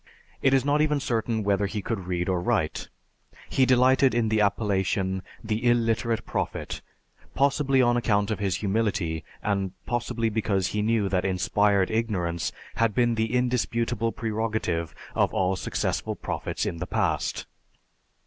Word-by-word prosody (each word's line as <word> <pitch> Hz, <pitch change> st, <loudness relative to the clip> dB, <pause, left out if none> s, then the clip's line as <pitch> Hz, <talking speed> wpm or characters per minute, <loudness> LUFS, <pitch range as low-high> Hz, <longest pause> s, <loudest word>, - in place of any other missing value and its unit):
It 135 Hz, -, +4 dB
is 135 Hz, 0 st, +2 dB
not 145 Hz, +1 st, +3 dB
even 150 Hz, -1 st, +2 dB
certain 115 Hz, -4 st, -1 dB
whether 100 Hz, 0 st, +1 dB
he 100 Hz, 0 st, -4 dB
could 95 Hz, -6 st, -3 dB
read 90 Hz, -1 st, -1 dB
or 90 Hz, -2 st, 0 dB
write. 95 Hz, -6 st, -1 dB, 0.6 s
He 130 Hz, -1 st, +3 dB
delighted 130 Hz, 0 st, +4 dB
in 115 Hz, -2 st, +2 dB
the 110 Hz, 0 st, +2 dB
appellation, 95 Hz, -2 st, 0 dB, 0.2 s
"The 110 Hz, +1 st, -2 dB
Illiterate 115 Hz, -1 st, +1 dB
Prophet," -, -, -3 dB, 0.5 s
possibly 135 Hz, -1 st, +3 dB
on 120 Hz, 0 st, +3 dB
account 105 Hz, -4 st, +1 dB
of 105 Hz, -, -2 dB
his 100 Hz, -3 st, 0 dB
humility 100 Hz, -6 st, -1 dB, 0.2 s
and 100 Hz, -2 st, -1 dB
possibly 120 Hz, -1 st, -1 dB
because 100 Hz, -4 st, 0 dB
he 105 Hz, -, -1 dB
knew 110 Hz, -1 st, +1 dB
that 90 Hz, -1 st, +1 dB
inspired 95 Hz, +1 st, +2 dB
ignorance 95 Hz, -7 st, -1 dB, 0.3 s
had 115 Hz, -3 st, +2 dB
been 120 Hz, -1 st, +3 dB
the 110 Hz, -1 st, -1 dB
indisputable 120 Hz, -2 st, 0 dB
prerogative 110 Hz, -8 st, -2 dB, 0.2 s
of -, -, +1 dB
all 95 Hz, 0 st, +2 dB
successful -, -, -2 dB
prophets -, -, -3 dB
in 85 Hz, -, -3 dB
the -, -, -4 dB
past. -, -, -1 dB
110 Hz, 150 wpm, -26 LUFS, 95-120 Hz, 0.6 s, It